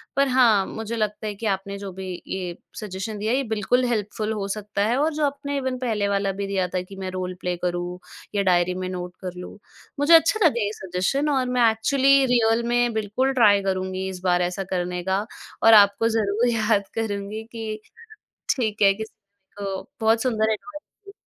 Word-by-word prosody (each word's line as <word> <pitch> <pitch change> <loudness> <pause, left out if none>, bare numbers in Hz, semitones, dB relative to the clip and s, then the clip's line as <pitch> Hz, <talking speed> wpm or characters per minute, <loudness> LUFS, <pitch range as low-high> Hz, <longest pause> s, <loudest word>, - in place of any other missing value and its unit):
पर 275 0 +3
हाँ, 235 -6 +4
मुझे 225 +1 -5
लगता 215 0 -2
है 210 - -3
कि 225 - -7
आपने 200 0 -2
जो 200 -1 -7
भी 190 0 -7 0.2
ये 180 -2 -4 0.2
सजेशन 210 +1 -5
दिया 215 +3 -1
है 260 - +2
ये 275 - 0
बिल्कुल 225 +3 +1
हेल्पफुल 215 -2 -2
हो 200 -2 -3
सकता 205 0 -2
है 245 +3 +1
और 310 +2 +1
जो 300 -1 +1
आपने 285 0 -3
इवन 260 -1 -2
पहले 215 -5 0
वाला 200 -1 0
भी 200 +1 -4
दिया 190 -2 0
था 180 - 0
कि 195 +2 -11
मैं 190 -1 -5
रोल 185 0 -4
प्ले 180 0 -1
करूँ, 175 0 -3 0.4
या 200 - +2
डायरी 180 -1 +2
में 185 0 -3
नोट 180 -1 -6
कर 180 -1 -5
लूँ। 180 - -9 0.4
मुझे 295 +4 +4
अच्छा 330 +7 +4
लगा 240 -7 +3
ये 205 - -1
सजेशन 190 +12 -1
और 265 -3 +1
मैं 245 -2 +4
एक्चुअली 270 +4 +3
रियल 235 -2 +2
में 240 -1 +2
बिल्कुल 220 +5 0
ट्राई 205 -5 +5
करुँगी 190 0 -2
इस 185 -1 -7
बार 180 -1 +2
ऐसा 180 +2 -1
करने 180 -1 -3
का, 190 +3 0 0.4
और 225 0 +8
आपको 205 +2 +6
ज़रूर 220 +1 +1
याद 215 -3 +1
करुँगी 210 0 -3
कि 220 -2 -5 0.8
ठीक 220 -5 -2
है, 195 -1 +6
किसी 220 +2 -8 0.5
को 195 -1 -3 0.2
बहुत 225 0 +3
सुंदर 220 -3 +1
एडवाइस 300 +7 -8 0.3
दी। 400 - -10
210 Hz, 200 wpm, -24 LUFS, 190-235 Hz, 0.8 s, और